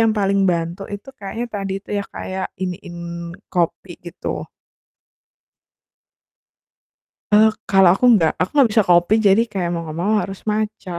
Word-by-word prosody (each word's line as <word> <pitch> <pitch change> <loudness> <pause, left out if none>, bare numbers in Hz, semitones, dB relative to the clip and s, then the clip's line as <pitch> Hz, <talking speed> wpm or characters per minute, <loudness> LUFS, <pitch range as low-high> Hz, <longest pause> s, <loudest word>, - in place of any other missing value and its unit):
yang 225 - +4
paling 195 -1 +2
bantu 170 +2 -1
itu 205 +6 -8
kayaknya 210 +4 -5
tadi 195 -2 -3
tuh - - -8
ya, 200 - -5
kayak 190 0 -5 0.2
iniin 180 -1 -5 0.6
kopi 175 0 -2
gitu. 175 0 -6 2.9
Eee, 215 +1 +7 0.2
kalau 195 -2 +6
aku 250 - +1
nggak. 165 -5 +3
Aku 180 - 0
nggak 275 -5 +5
bisa 220 -1 +4
kopi, 175 +3 +4
jadi 195 +3 +5
kayak 180 -4 -2
mau 170 - -2
enggak 155 0 -7
mau 205 +4 +1
harus 195 0 -7
matcha. 210 -3 -3
195 Hz, 145 wpm, -20 LUFS, 175-210 Hz, 2.9 s, Eee